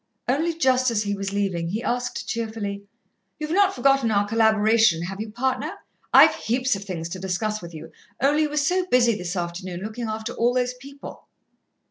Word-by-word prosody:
Only 320 +6 +1
just 255 -4 +3
as 220 -2 0
he 205 -1 -2
was 195 -1 -4
leaving, 195 -4 -1
he 215 +7 -3
asked 245 0 -2
cheerfully: 215 -3 -4 0.5
"You've 305 0 -5
not 390 +2 +3
forgotten 270 -1 +3
our 205 -1 +2
collaboration, 220 -4 +3
have 195 +3 -5
you, 220 - -5
partner? 255 +3 -1 0.4
I've - - +8
heaps 255 +1 0
of 195 - -6
things 175 -5 -5
to 185 - -6
discuss 210 +3 -2
with 170 -1 -10
you, 160 +1 -9 0.3
only 290 +4 +3
you 305 - +1
were 300 - -4
so 360 +5 +1
busy 240 -6 +4
this 180 -1 -5
afternoon, 175 +1 -4
looking 220 +3 -5
after 220 0 -4
all 240 +2 +1
those 250 0 0
people." 275 +3 -12
220 Hz, 185 wpm, -24 LUFS, 195-255 Hz, 0.5 s, I've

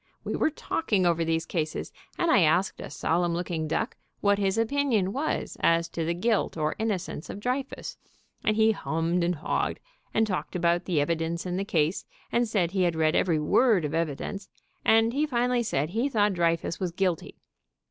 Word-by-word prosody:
We - - -3
were - - +2
talking 215 - -1
over 170 -1 +2
these 165 0 0
cases, 155 -3 -3 0.2
and 340 -2 +2
I - - +6
asked 175 +4 +2
a - - -7
solemn 170 +1 0
looking 170 -2 -2
duck 220 +9 -2 0.2
what 200 0 +2
his 195 +1 +1
opinion 225 -5 +1
was 295 +4 -2
as 165 0 +3
to 165 - -3
the 170 +1 -1
guilt 215 0 0
or 155 -1 0
innocence 200 -8 -3
of - - -6
Drey 250 +5 0
fus, 270 - -8 0.5
and 215 - +2
he 220 0 +5
hummed, 170 -3 -1
and 175 +1 +1
hawed, 155 - -1 0.3
and 220 - +2
talked 185 -3 -3
about 175 0 +1
the 170 -5 +1
evidence 165 +3 -1
in 180 -1 -2
the 195 - -1
case, 165 -3 0 0.3
and 240 0 +2
said 190 -6 0
he 190 -1 0
had 175 -2 +2
read 160 0 +2
every 170 -4 +2
word 190 +4 +3
of 150 - -3
evidence, 165 +5 -3 0.3
and 225 +1 +4
he 295 +3 +1
finally 245 -2 +1
said 155 -8 -1
he 235 +7 0
thought 210 -5 +2
Dreyfus 170 -1 0
was 185 -2 -2
guilty. 180 -2 -2
180 Hz, 190 wpm, -27 LUFS, 165-220 Hz, 0.5 s, I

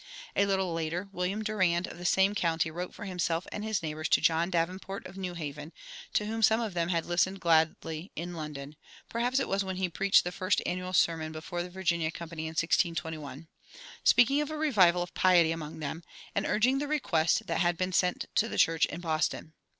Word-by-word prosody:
A 200 - +3
little 190 -3 0
later 165 +4 -3
William 195 +3 -2
Durand, 185 -5 +1
of - - -10
the 175 - -7
same 190 +3 +3
county, 165 -4 0
wrote 180 +3 -5
for - - -9
himself 175 -2 -1
and 210 - -5
his 215 -5 -1
neighbors 155 0 -3
to - - +5
John 165 +1 +2
Davenport, 185 +3 -2
of 185 - -10
New 185 -2 -5
Haven, 150 -1 -6 0.4
to 210 - +1
whom 225 +1 -3
some 220 +1 +5
of 225 -5 -3
them 170 -1 -1
had 170 -2 0
listened 180 +3 +1
gladly 160 +1 +1
in 175 +2 -5
London 150 -2 -7 0.3
(perhaps 245 +3 0
it - - -1
was 195 0 0
when 190 -1 -4
he 185 -1 -1
preached 195 +3 +4
the 180 - -3
first 185 +2 0
annual 180 +1 -3
sermon 165 -2 +2
before 160 +2 -5
the 175 - -5
Virginia 170 -3 0
Company 165 -1 -6
in 160 - -5
1621), 160 -3 -1 0.6
speaking 275 +5 +5
of 295 - -3
"a 310 - -4
revival 190 - +4
of 175 - -10
piety" 175 -3 +4
among 160 -2 -5
them, 155 +2 -5 0.3
and 200 - 0
urging 250 +5 +2
the 290 - -2
request 200 - +1
that 165 - -1
had 175 -1 +2
been 185 +1 -2
sent 180 +1 +1
to 225 - +2
the - - -5
church 165 0 +4
in 170 - -7
Boston. 160 -1 -1
175 Hz, 205 wpm, -29 LUFS, 165-195 Hz, 0.6 s, to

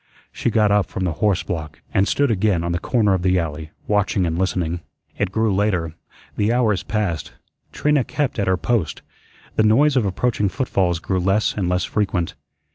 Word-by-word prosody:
She - - -1
got 105 -2 +3
up 105 -1 +3
from 95 - -4
the 90 - 0
horse 105 -4 +2
block 75 -4 -5
and 100 - +3
stood 140 +4 +2
again 100 -4 +1
on 85 - -1
the 85 - -1
corner 105 -1 +2
of 95 - 0
the 95 0 +2
alley, 80 -2 -3 0.2
watching 105 -2 +1
and 80 -1 -1
listening. 90 -2 -1 0.4
It 100 -2 0
grew 110 0 +1
later. 95 -5 0 0.4
The 105 +2 +2
hours 110 -6 +2
passed. 95 -6 -2 0.4
Trina 150 -3 +2
kept 145 -4 -2
at 100 - 0
her 95 -1 +3
post. 105 -4 -1 0.5
The 110 - +4
noise 135 +7 +4
of 120 -6 +2
approaching 105 +1 0
footfalls 95 -8 0
grew 95 +3 -2
less 95 +4 +1
and 95 -4 -1
less 90 0 +1
frequent. 100 -5 -1
100 Hz, 190 wpm, -21 LUFS, 90-110 Hz, 0.5 s, The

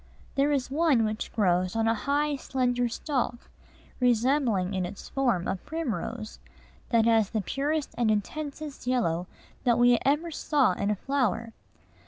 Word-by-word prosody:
There 280 +1 +2
is 265 -2 -1
one 285 -6 +3
which 215 +1 -3
grows 185 -3 +1
on 225 0 +1
a 225 - +4
high, 285 +6 0
slender 245 -3 0
stalk, 245 -1 -3 0.5
resembling 240 -5 +2
in 185 -1 -1
its 180 +3 -7
form 240 -10 0
a 190 - -1
primrose, 235 - -4 0.5
that 230 -2 +3
has 225 -3 +4
the 220 - -1
purest 285 - -2
and 235 -2 +3
intensest 285 +6 -3
yellow 180 -9 0 0.4
that 240 -2 +3
we 245 0 +5
ever 300 +5 +1
saw 290 -6 +2
in 200 +3 -2
a 210 - +2
flower. 230 -2 -1
245 Hz, 150 wpm, -27 LUFS, 215-280 Hz, 0.5 s, we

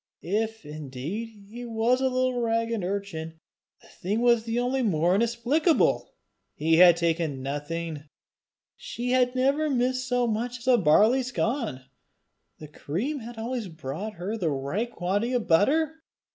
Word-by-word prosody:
If 220 +1 -2
indeed 150 - -6 0.2
he 240 +2 -7
was 235 +2 +1
a 265 - +2
little 255 -1 0
ragged 230 -2 0
urchin, 175 -4 -4 0.4
the - - -18
thing 205 +5 -3
was 235 -1 +3
only 250 +2 0
the 230 - +2
more 170 +1 +2
inexplicable! 235 - +1 0.4
He 160 +2 +2
had 175 -1 +8
taken 165 -5 -1
nothing! 150 +2 -4 0.7
She 245 +1 -4
had 250 0 +2
never 280 +4 +2
missed 255 -1 0
so 245 -1 +1
much 235 +2 -2
as 250 +1 -13
a 250 -2 +5
barley 210 +10 +4
scon! 235 - -2 0.7
The 155 - -10
cream 200 - -3
had 235 0 -9
always 230 -1 -3
brought 165 +6 -6
her 185 +5 -4
the 175 -7 0
right 145 - -2
quantity 205 +4 -1
of 245 -3 -1
butter! 305 - +2
225 Hz, 145 wpm, -26 LUFS, 165-245 Hz, 0.7 s, had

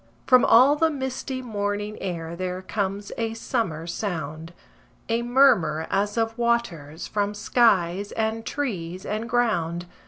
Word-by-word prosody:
From 255 -2 +6
all 260 +5 +6
the 325 +2 +3
misty 265 -2 -4
morning 205 -2 -3
air 170 -3 -4
there 185 +1 -4
comes 200 0 -3
a 225 -1 -2
summer 220 -9 -2
sound 165 -4 -4 0.6
A 230 +1 +1
murmur 235 - +3
as 205 +3 0
of 225 0 0
waters 180 -11 -1
from 205 0 -1
skies 205 -4 +2
and 220 0 -1
trees 185 -11 -4
and 220 +3 -3
ground. 175 -8 0
205 Hz, 130 wpm, -25 LUFS, 175-235 Hz, 0.6 s, From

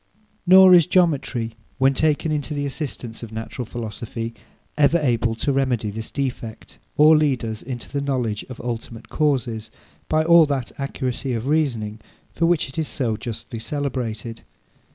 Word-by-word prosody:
Nor 185 0 +9
is 175 -2 +7
geometry, 140 -10 +1 0.2
when 135 0 +4
taken 155 +2 +1
into 150 0 -2
the 145 0 -1
assistance 135 -5 -5
of 115 -2 -8
natural 110 +2 -5
philosophy, 115 0 -5 0.4
ever 150 +3 +4
able 120 -6 +1
to 140 +5 -1
remedy 125 -6 0
this 110 +2 -6
defect, 125 -5 -5 0.2
or 155 +1 +7
lead 145 -6 +2
us 110 -1 -4
into 125 -2 -6
the 140 +1 -3
knowledge 125 -7 -1
of 130 - -8
ultimate 115 -1 -6
causes, 120 -7 0 0.4
by 155 0 +3
all 170 -1 +7
that 135 -4 -2
accuracy 130 -1 -3
of 115 0 -3
reasoning 120 -8 0 0.3
for 165 - +1
which 170 -3 +2
it 135 +4 -6
is 155 - -1
so 115 -5 -1
justly 115 +1 -6
celebrated. 120 -5 -4
130 Hz, 155 wpm, -22 LUFS, 115-150 Hz, 0.4 s, Nor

